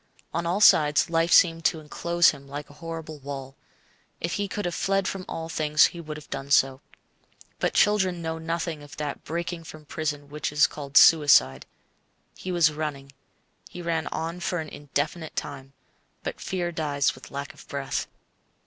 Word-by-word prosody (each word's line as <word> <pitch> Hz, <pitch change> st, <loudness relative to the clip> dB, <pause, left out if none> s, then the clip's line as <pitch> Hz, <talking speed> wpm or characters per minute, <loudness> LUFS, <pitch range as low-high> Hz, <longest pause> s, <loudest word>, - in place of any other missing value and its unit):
On 170 Hz, +1 st, -1 dB
all 185 Hz, +5 st, 0 dB
sides 150 Hz, -5 st, +5 dB
life 165 Hz, +1 st, +2 dB
seemed 165 Hz, -2 st, +5 dB
to 160 Hz, -, +2 dB
enclose 170 Hz, +3 st, +2 dB
him 140 Hz, -2 st, -12 dB
like 145 Hz, +1 st, -7 dB
a 145 Hz, -, -18 dB
horrible 160 Hz, -2 st, -6 dB
wall. 135 Hz, -1 st, -7 dB, 0.6 s
If 170 Hz, -, -2 dB
he 205 Hz, 0 st, -1 dB
could 205 Hz, 0 st, -4 dB
have 175 Hz, -, -1 dB
fled 195 Hz, +2 st, 0 dB
from 190 Hz, -1 st, -4 dB
all 165 Hz, 0 st, -4 dB
things, 150 Hz, -2 st, +4 dB
he 170 Hz, -, -7 dB
would 155 Hz, -2 st, -7 dB
have 150 Hz, -, -12 dB
done 135 Hz, 0 st, -5 dB
so. 135 Hz, -1 st, +3 dB, 0.8 s
But -, -, 0 dB
children 190 Hz, -4 st, +3 dB
know 160 Hz, -1 st, -4 dB
nothing 165 Hz, -1 st, -3 dB
of 145 Hz, 0 st, -12 dB
that 150 Hz, -2 st, -4 dB
breaking 170 Hz, +1 st, -4 dB
from 155 Hz, -1 st, -11 dB
prison 150 Hz, -2 st, -3 dB
which 150 Hz, 0 st, -4 dB
is 150 Hz, 0 st, +5 dB
called 140 Hz, -1 st, -2 dB
suicide. 145 Hz, -, +6 dB, 0.7 s
He 185 Hz, -, -6 dB
was 170 Hz, -3 st, +3 dB
running. 145 Hz, -3 st, -5 dB, 0.6 s
He 175 Hz, -, -8 dB
ran 165 Hz, -1 st, -1 dB
on 165 Hz, +2 st, -4 dB
for 175 Hz, 0 st, -2 dB
an 160 Hz, -2 st, -4 dB
indefinite 150 Hz, +3 st, -3 dB
time; 135 Hz, -1 st, -5 dB, 0.5 s
but -, -, -5 dB
fear 175 Hz, -2 st, -2 dB
dies 145 Hz, -4 st, 0 dB
with 130 Hz, -, -13 dB
lack 140 Hz, 0 st, -6 dB
of -, -, -16 dB
breath. 140 Hz, -1 st, -3 dB
155 Hz, 175 wpm, -26 LUFS, 145-170 Hz, 0.8 s, suicide